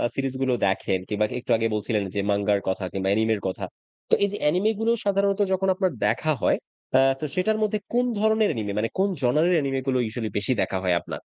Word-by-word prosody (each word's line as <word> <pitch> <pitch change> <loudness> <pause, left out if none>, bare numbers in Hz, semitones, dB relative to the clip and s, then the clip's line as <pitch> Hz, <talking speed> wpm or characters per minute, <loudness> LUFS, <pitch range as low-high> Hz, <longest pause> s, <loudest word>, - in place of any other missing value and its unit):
Series 135 -1 -2
গুলো 130 -1 +2
দেখেন, 95 -1 0
কিংবা 105 0 0
একটু 125 - -5
আগে 115 0 +1
বলছিলেন 105 -1 -1
যে - - 0
মাঙ্গার 100 0 +1
কথা 95 0 -1
কিংবা 95 0 -2
অ্যানিমের 110 0 +1
কথা। 95 - -4 0.4
তো, - - -1
এই 200 - +2
যে 205 - -4
অ্যানিমে 180 +9 +2
গুলো 225 +1 +2
সাধারণত 200 0 +1
যখন 190 +1 0
আপনার 185 -1 0
দেখা 155 +8 +1
হয়, - - +3 0.4
আ - - +6 0.2
তো 155 - -3
সেটার 215 +4 +1
মধ্যে 215 0 0
কোন 245 +1 +3
ধরনের 220 0 +3
অ্যানিমে 110 -7 -3
মানে, 115 +1 0
কোন 200 +1 +3
জনারের 155 +8 +3
অ্যানিমে 135 -3 0
গুলো, 130 - +2
ইউজুয়ালি 110 -1 -4
বেশি 100 +5 +1
দেখা 95 - -1
হয় 90 -1 +2
আপনার? - - -6
130 Hz, 215 wpm, -24 LUFS, -, 0.4 s, আ